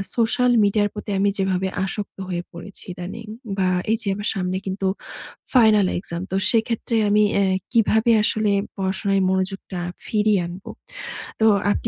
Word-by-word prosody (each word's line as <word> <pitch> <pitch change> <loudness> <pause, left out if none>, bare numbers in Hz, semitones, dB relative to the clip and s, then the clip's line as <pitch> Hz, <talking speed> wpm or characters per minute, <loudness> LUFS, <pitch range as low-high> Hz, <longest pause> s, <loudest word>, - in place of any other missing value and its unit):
Social 245 +1 +2
মিডিয়ার 205 0 +2
প্রতি 210 -1 -6
আমি 200 +1 +3
যেভাবে 190 -1 +1 0.2
আসক্ত 205 +1 -5
হয়ে 175 -1 -2
পড়েছি 180 +3 -8
ইদানিং 180 +5 -7 0.3
বা, 185 -1 +2 0.3
এইযে 225 -2 -1
আমার 205 +1 -2
সামনে 185 0 -1
কিন্তু 190 0 -2 0.7
ফাইনাল 215 -6 +5
এক্সাম। 170 -1 -5
তো - - 0 0.2
সেক্ষেত্রে 230 0 0
আমি 210 +1 +4 0.2
এ - - +4 0.3
কিভাবে 225 0 +3
আসলে 215 -1 +1 0.3
পড়াশোনায় 195 +1 0
মনোযোগটা 190 -1 -2 0.3
ফিরিয়ে 210 -2 +2
আনবো। 180 +2 -9 0.7
তো - - +5 0.3
আপনি - - -1
200 Hz, 140 wpm, -22 LUFS, 190-215 Hz, 0.7 s, ফাইনাল